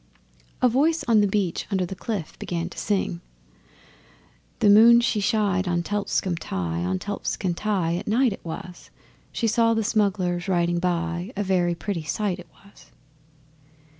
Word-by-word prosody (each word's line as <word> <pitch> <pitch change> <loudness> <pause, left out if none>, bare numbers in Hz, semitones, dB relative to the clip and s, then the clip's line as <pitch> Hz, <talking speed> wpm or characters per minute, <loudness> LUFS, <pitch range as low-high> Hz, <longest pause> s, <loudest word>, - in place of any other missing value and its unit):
A - - +7
voice 300 +7 +2
on 225 -3 +4
the 205 - +3
beach 195 -4 -1
under 190 -3 0
the 180 - -6
cliff 195 -4 -4
began 170 0 -3
to - - -13
sing: 190 -4 -1 1.4
'The 210 - +3
moon 230 +3 +8
she 235 -2 +1
shined 200 -3 +1
on 175 -1 0
Telscombe 195 -3 -1
Tye 85 - -3
On 90 +1 -1
Telscombe 190 - -3
Tye 180 -5 0
at 195 - -7
night 235 +1 +2
it - - -12
was 180 +2 -8 0.4
She 235 - -2
saw 230 +1 +3
the 225 - 0
smugglers 195 -5 0
riding 175 -2 +1
by, 175 +2 -2
A 205 - 0
very 180 -3 +1
pretty 185 -1 -3
sight 185 +3 -2
it 175 - -12
was! 200 +1 -20
190 Hz, 160 wpm, -24 LUFS, 175-215 Hz, 1.4 s, moon